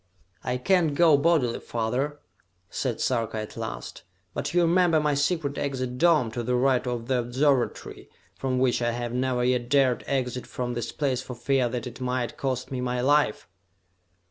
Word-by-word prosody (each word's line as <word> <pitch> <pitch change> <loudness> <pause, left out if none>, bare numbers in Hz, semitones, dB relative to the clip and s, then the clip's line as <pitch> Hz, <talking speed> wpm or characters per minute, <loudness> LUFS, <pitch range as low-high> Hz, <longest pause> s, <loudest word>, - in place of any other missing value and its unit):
"I 125 0 -1
can't 160 +2 +2
go 165 -1 +6
bodily, 140 -5 +2
father," 125 +6 -2 0.5
said 125 -5 -2
Sarka 115 -3 -1
at 110 -1 -6
last, - - -6 0.3
"but - - -3
you 175 0 +3
remember 170 -1 +4
my 150 -1 +1
secret 145 0 0
exit 130 -3 -3
dome, 160 -9 +4
to 120 - -3
the 125 +2 0
right 130 0 +2
of 120 -2 -3
the 130 0 +1
observatory, 130 +2 0 0.2
from 130 -1 -2
which 125 -1 +2
I 120 0 +1
have 120 0 -4
never 125 0 0
yet 125 -1 +1
dared 135 -3 +3
exit 125 -2 -2
from 125 -1 -3
this 120 -1 -3
place 135 -4 -1
for 125 - -8
fear 125 +1 +1
that 125 0 -4
it 125 +1 -8
might 125 -1 -2
cost 130 -2 -3
me 130 -2 -3
my 125 0 -1
life?" 140 -3 +2
125 Hz, 175 wpm, -26 LUFS, 120-140 Hz, 0.5 s, go